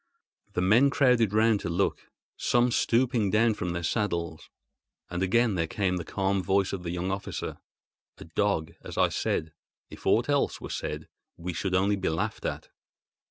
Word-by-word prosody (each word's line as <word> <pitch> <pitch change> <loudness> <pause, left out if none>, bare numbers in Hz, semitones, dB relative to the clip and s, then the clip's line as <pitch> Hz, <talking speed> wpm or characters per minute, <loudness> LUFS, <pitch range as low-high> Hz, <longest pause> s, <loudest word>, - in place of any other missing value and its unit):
The 90 - 0
men 115 +9 +5
crowded 125 -7 +3
round 110 0 +3
to - - -4
look, 90 +4 -1 0.3
some 120 0 +2
stooping 120 -3 +2
down 110 +3 +3
from 90 -4 -3
their 85 0 -3
saddles; 85 -5 -2 0.6
and 90 +1 -2
again 115 +4 +3
there 85 -3 0
came 90 0 0
the 85 - -4
calm 95 +3 0
voice 95 +1 +1
of 95 - -3
the 85 - -5
young 90 +2 -2
officer: 95 +1 -4 0.6
"A - - -10
dog, 80 -1 -1
as - - -8
I - - +4
said. 80 -1 -2 0.4
If - - -8
aught - - +3
else - - +1
were - - -7
said 75 +1 -4 0.3
we 90 +1 -4
should 95 +2 -1
only 100 +2 +2
be 95 - -1
laughed 100 +8 -2
at." - - -5
95 Hz, 175 wpm, -28 LUFS, 90-110 Hz, 0.6 s, men